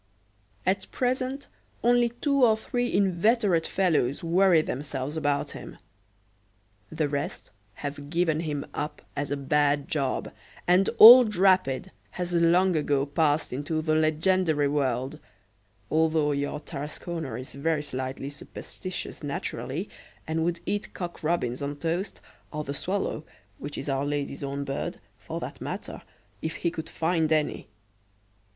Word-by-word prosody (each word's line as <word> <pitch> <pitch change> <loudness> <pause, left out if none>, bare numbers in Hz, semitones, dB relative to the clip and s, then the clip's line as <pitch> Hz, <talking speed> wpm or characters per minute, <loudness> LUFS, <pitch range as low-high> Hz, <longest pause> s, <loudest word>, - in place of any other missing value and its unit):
At 190 +1 0
present, 255 +2 -1 0.4
only 240 0 +4
two 275 +3 +1
or 220 -3 +5
three 245 +2 -2
inveterate 195 -2 +2
fellows 160 -8 +1
worry 170 -1 +4
themselves 140 +1 -4
about 145 -2 0
him. - - -9 1.1
The 155 - 0
rest 145 0 -4 0.2
have 145 0 -6
given 165 -1 +1
him 150 -3 -3
up 150 0 -4
as 145 0 -2
a 145 - -1
bad 145 0 +2
job, 140 -4 -1 0.4
and 180 +2 +4
old 235 -1 +10
Rapid 185 -4 +3 0.3
has 180 -1 -3
long 175 +2 +4
ago 145 -2 +1
passed 145 0 +1
into 145 +4 -2
the 155 0 +1
legendary 155 0 +2
world, 135 -2 -1 0.7
although 155 -1 +2
your 145 +1 -2
Tarasconer 150 -1 -5
is 130 - -8
very 150 +2 0
slightly 130 0 -4
superstitious 180 +5 -7
naturally, 145 +3 -4 0.4
and 160 0 -1
would 170 0 -1
eat 205 +2 -3
cock 175 -2 -5
robins 150 -6 0
on 140 +1 -3
toast, 170 +6 -3 0.3
or 150 0 -3
the 140 - -4
swallow, 185 0 -2 0.4
which 145 +1 -6
is 140 - -5
Our 135 0 0
Lady's 145 -1 -3
own 140 0 -3
bird, 135 0 -3 0.2
for - - -5
that - - -7
matter, - - -5 0.4
if 160 - -3
he 170 - -1
could 160 -1 -6
find 160 -1 0
any. 155 -1 0
155 Hz, 135 wpm, -27 LUFS, 145-180 Hz, 1.1 s, old